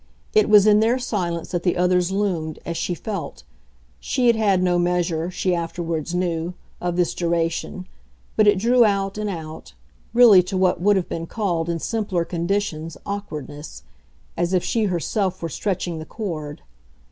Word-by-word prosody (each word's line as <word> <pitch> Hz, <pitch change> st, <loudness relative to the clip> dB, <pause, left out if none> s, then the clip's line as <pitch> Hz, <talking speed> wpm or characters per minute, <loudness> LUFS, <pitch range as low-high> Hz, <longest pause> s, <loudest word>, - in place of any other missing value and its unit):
It 430 Hz, -1 st, +4 dB
was 210 Hz, -1 st, +7 dB
in 210 Hz, 0 st, +6 dB
their 230 Hz, +3 st, +3 dB
silence 180 Hz, -9 st, -3 dB
that 175 Hz, -2 st, -1 dB
the 175 Hz, 0 st, 0 dB
others 180 Hz, 0 st, +2 dB
loomed, 180 Hz, -6 st, -1 dB
as 170 Hz, -, -3 dB
she 175 Hz, -, -2 dB
felt; 200 Hz, -2 st, -6 dB, 0.6 s
she 255 Hz, -2 st, -1 dB
had 235 Hz, -1 st, +5 dB
had 200 Hz, -4 st, +2 dB
no 175 Hz, -1 st, +2 dB
measure, 175 Hz, -1 st, 0 dB
she 185 Hz, 0 st, -1 dB
afterwards 170 Hz, -1 st, -3 dB
knew, 175 Hz, -1 st, -1 dB, 0.3 s
of 175 Hz, -1 st, -1 dB
this 175 Hz, -1 st, +1 dB
duration, 170 Hz, +1 st, -2 dB, 0.5 s
but 215 Hz, -, +4 dB
it 205 Hz, -1 st, +5 dB
drew 240 Hz, +5 st, +4 dB
out 200 Hz, -1 st, 0 dB
and 210 Hz, -1 st, -2 dB
out 160 Hz, -, -7 dB, 0.4 s
really 230 Hz, -6 st, +8 dB
to 185 Hz, +2 st, -4 dB
what 185 Hz, -2 st, +2 dB
would 205 Hz, +2 st, +4 dB
have 190 Hz, -2 st, 0 dB
been 165 Hz, 0 st, -5 dB
called 175 Hz, -6 st, -1 dB
in 170 Hz, -, 0 dB
simpler 195 Hz, -2 st, -1 dB
conditions 170 Hz, -2 st, -2 dB
awkwardness 150 Hz, -, -6 dB, 0.5 s
as 175 Hz, +2 st, -1 dB
if 180 Hz, -, +2 dB
she 225 Hz, -2 st, 0 dB
herself 190 Hz, +1 st, -1 dB
were 165 Hz, -, -4 dB
stretching 175 Hz, -1 st, -3 dB
the 155 Hz, -, -7 dB
cord. 155 Hz, -9 st, -5 dB
180 Hz, 170 wpm, -22 LUFS, 170-205 Hz, 0.6 s, really